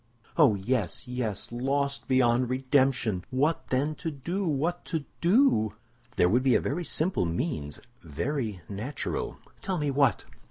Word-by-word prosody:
"Oh, 140 -10 +5
yes, 105 +2 -1
yes; 125 -5 -3
lost 140 +3 -1
beyond 125 -1 +3
redemption! 130 -6 +1
What, 145 +6 0
then, 140 +4 0
to 165 - -1
do? 170 +7 -3
What 160 +4 -1
to 160 -4 -3 0.2
do?" 180 - +4 0.4
"There 90 - +4
would 120 +7 +3
be 130 -2 +3
a - - +5
very 165 +6 -2
simple 160 - +2
means, 85 - -3 0.2
very 105 - -3
natural—" 110 +8 -4 0.2
"Tell 190 -2 -2
me 150 -3 0
what!" 135 -6 +2
130 Hz, 145 wpm, -28 LUFS, 110-150 Hz, 0.4 s, Oh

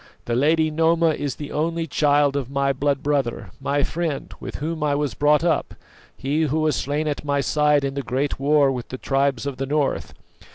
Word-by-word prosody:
The 120 - -2
lady 155 +5 +3
Noma 165 +1 +3
is 145 -3 -3
the 145 - -7
only 165 +2 -1
child 145 -1 +2
of 135 -3 -2
my 140 0 +1
blood 140 +1 -1
brother, 135 - -1
my 140 +1 0
friend, 160 -3 -3
with - - -7
whom 160 +2 -4
I 145 -1 +1
was 145 -1 -1
brought 150 +2 +3
up, 170 - 0 0.4
he 145 +4 -1
who 155 +2 0
was 155 -3 +1
slain 145 +3 -1
at 145 -1 -2
my 140 -1 0
side 150 0 +2
in 135 0 -1
the 140 - -2
great 135 +3 -2
war 140 0 +4
with 125 -2 -5
the 130 - -5
tribes 135 -2 0
of 140 -2 -4
the 135 - -3
north. 145 -1 -1
145 Hz, 205 wpm, -23 LUFS, 135-150 Hz, 0.4 s, war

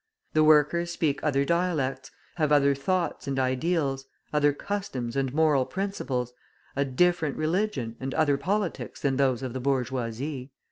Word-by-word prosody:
The 155 - +4
workers 155 +3 +4
speak 150 -4 0
other 140 -2 +2
dialects, 150 -6 0 0.3
have 155 -3 +1
other 140 -1 +5
thoughts 175 +3 -1
and 135 -1 -1
ideals, 135 +1 0 0.3
other 145 -1 +4
customs 140 -9 -4
and 135 -2 0
moral 150 -2 +3
principles, 130 -9 -3 0.4
a 140 - +2
different 155 +2 +1
religion 155 - -1
and 135 -1 -4
other 145 -3 +3
politics 200 0 -2
than 140 -4 0
those 135 -2 +2
of 130 -2 -4
the 130 - -3
bourgeoisie. 130 +1 -2
140 Hz, 145 wpm, -27 LUFS, 130-165 Hz, 0.4 s, other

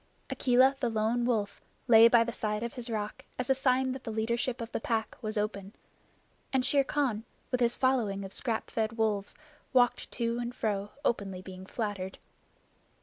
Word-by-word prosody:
Akela 260 +1 +4
the 245 - +1
Lone 225 +2 +1
Wolf 215 -5 -1 0.3
lay 230 -1 +9
by 235 0 +6
the 235 0 -4
side 210 0 -2
of 235 - -4
his 245 -2 -5
rock 210 -2 -3
as 250 +1 0
a - - +7
sign 260 -1 +2
that 260 0 -6
the 225 - -4
leadership 235 +3 -1
of 230 0 -6
the - - -2
Pack 225 -1 -1
was 215 -1 -3
open, 205 -1 -2 0.8
and 260 -1 +1
Shere 280 +1 +4
Khan 265 -6 0 0.3
with 250 - +1
his 240 -1 +2
following 225 -7 +1
of 195 - -9
scrap 230 -4 -2
fed 225 0 -1
wolves 210 -3 0 0.4
walked 245 -2 +3
to 235 0 -1
and 240 0 -4
fro 205 -3 -1 0.2
openly 195 -6 -1
being 185 0 -9
flattered. 200 -5 -4
230 Hz, 180 wpm, -30 LUFS, 210-250 Hz, 0.8 s, lay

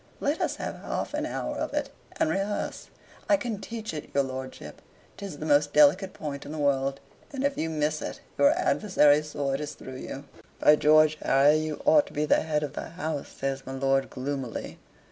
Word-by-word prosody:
Let 290 +3 -1
us - - 0
have - - -5
half - - -4
an - - -1
hour - - -3
of - - -3
it, - - -1 0.3
and 320 - +3
rehearse 200 +1 -2 0.4
I 300 - +6
can 230 -7 -4
teach 220 -4 -6
it 150 - -6
your 140 - +4
lordship: 130 0 -7 0.4
'tis 195 -7 -7
the 155 - -6
most 145 -1 +3
delicate 155 +6 +5
point 145 -2 -6
in - - -8
the 155 - -5
world, 135 -2 +1 0.3
and 275 -1 -4
if 280 0 +1
you 160 - -2
miss 155 -1 -1
it, - - -5 0.2
your 285 - +7
adversary's 150 - +3
sword 140 -1 -2
is 150 - -5
through 130 0 -9
you." 135 +1 -7 0.4
"By 150 - +7
George, 155 0 +4
Harry, 140 +3 +5
you 155 - -3
ought 300 0 +5
to - - -13
be 150 0 0
the - - +3
head 150 -1 -1
of 145 - -4
the - - -6
house," 160 -4 -4
says 135 0 -4
my 135 - -5
lord, 135 0 +1
gloomily. 135 -2 -5
150 Hz, 205 wpm, -27 LUFS, 140-185 Hz, 0.4 s, your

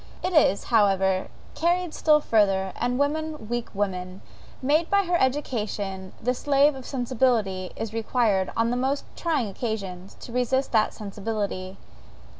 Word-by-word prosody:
It 365 +1 -1
is, 290 - +4
however, 195 -4 +2 0.3
carried 345 0 0
still 305 -1 +4
further, 195 -6 +2
and 245 +1 0
woman, 300 -2 -1
weak 240 0 -2
woman! 185 -2 -3 0.4
made 300 +5 +2
by 400 +1 +4
her 355 -1 0
education 210 -8 -2
the 250 +3 0
slave 285 +3 +3
of 265 -2 -9
sensibility, 235 -8 0
is 220 -1 -5
required, 220 -4 +1
on 230 +1 +2
the 245 - 0
most 270 +3 -1
trying 305 -9 0
occasions, 195 -3 -5
to - - -9
resist 250 +2 0
that 220 -2 +2
sensibility. 200 -2 -4
230 Hz, 140 wpm, -25 LUFS, 195-275 Hz, 0.4 s, is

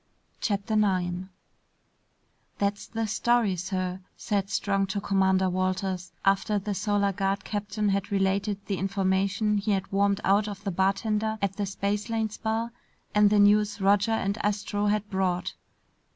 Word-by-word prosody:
CHAPTER 205 +1 -1
9 185 -3 0 1.3
"That's 200 0 -1
the 225 0 -2
story, 225 -1 +2
sir," 185 0 -3 0.2
said 200 -2 -1
Strong 195 -2 0
to 195 +1 -2
Commander 190 -1 +2
Walters, 185 0 -2
after 195 +2 +2
the 205 +1 -2
Solar 200 0 +1
Guard 195 +1 -1
captain 205 0 -2
had 200 0 -1
related 200 +1 0
the 195 -3 -2
information 195 +2 +1
he 205 +1 0
had 195 0 -2
wormed 200 0 +2
out 205 +2 +3
of 200 -1 -7
the 200 - -2
bartender 210 +4 0
at 195 -1 -2
the 205 -1 -1
Spacelanes 210 +3 -2
Bar 225 +1 -1 0.4
and 210 0 +5
the 210 - +3
news 205 +1 +4
Roger 200 +3 +3
and 200 -1 -1
Astro 205 0 0
had 210 0 0
brought. 185 -2 -1
200 Hz, 145 wpm, -27 LUFS, 190-210 Hz, 1.3 s, and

